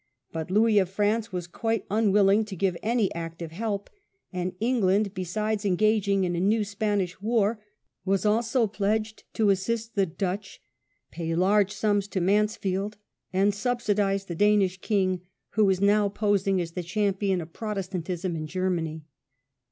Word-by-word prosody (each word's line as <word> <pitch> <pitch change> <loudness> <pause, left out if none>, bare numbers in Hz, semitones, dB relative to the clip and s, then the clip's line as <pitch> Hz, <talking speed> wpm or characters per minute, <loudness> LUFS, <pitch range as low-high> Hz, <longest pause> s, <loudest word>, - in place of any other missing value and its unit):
But 160 0 -4
Louis 215 +2 +4
of 190 -2 +1
France 210 +3 0
was 180 -2 -3
quite 225 +6 -2
unwilling 205 -1 +4
to 205 -2 -7
give 190 0 0
any 225 -2 +1
active 165 0 -6
help, 205 +2 -3 0.5
and 180 0 -1
Parliament 180 - -15
England, 210 -4 +2
besides 210 +3 -2
engaging 200 0 +2
in 175 -1 0
the 170 - -1
new 210 +4 +2
Spanish 205 -3 -1
o*" - - -37
*^5. - - -33
war, 215 -1 +1 0.4
was 195 +1 0
also 230 +3 +2
pledged 215 +1 -2
to 215 -2 +4
assist 225 +4 -1
the 195 -2 +2
Dutch, 190 +3 -4 0.5
pay 165 0 -3
large 200 +3 +3
sums 205 -1 0
to 200 - -2
Mansfield, 205 +1 0 0.3
and 195 +2 +2
subsidize 205 -3 0
the 175 - -5
Danish 195 0 +3
king, 185 -4 +1 0.3
who 215 0 +3
was 190 -2 +2
now 205 0 +4
posmg 200 -2 +1
as 165 -1 -5
the 180 - -4
champion 195 +1 0
of 165 -1 -8
Protestantism 185 -4 -3
in 155 -1 -4
Germany. 165 -3 -2
200 Hz, 160 wpm, -26 LUFS, 185-215 Hz, 0.5 s, Louis